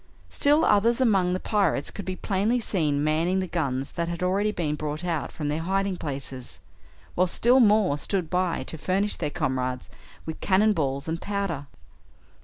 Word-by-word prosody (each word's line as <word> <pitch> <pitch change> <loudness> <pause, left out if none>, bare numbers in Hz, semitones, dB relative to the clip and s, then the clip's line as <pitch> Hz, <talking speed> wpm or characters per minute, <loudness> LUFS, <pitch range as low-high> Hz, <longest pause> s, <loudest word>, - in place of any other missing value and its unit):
Still 295 +3 +3
others 230 +4 +3
among 195 -8 +3
the 185 - -1
pirates 200 -10 0
could 200 - -7
be 185 - -3
plainly 205 +6 0
seen 155 -10 0
manning 165 +5 +1
the 190 - -1
guns 140 -7 -2
that 170 0 -2
had 170 +1 -4
already 200 +3 +1
been 160 -7 -2
brought 150 +2 -4
out 165 -4 -2
from 150 - -4
their 150 +2 -1
hiding 195 +2 0
places, 135 - -6 0.5
while 185 +1 +2
still 240 +8 +4
more 210 - +4
stood 185 +1 -1
by 180 0 0
to 160 - -8
furnish 195 +5 0
their 150 - -2
comrades 130 -5 -2 0.3
with 160 - -6
cannon 210 +3 +3
balls 140 -3 -2
and 165 +1 -3
powder. 195 -9 -3
180 Hz, 175 wpm, -26 LUFS, 150-200 Hz, 0.5 s, still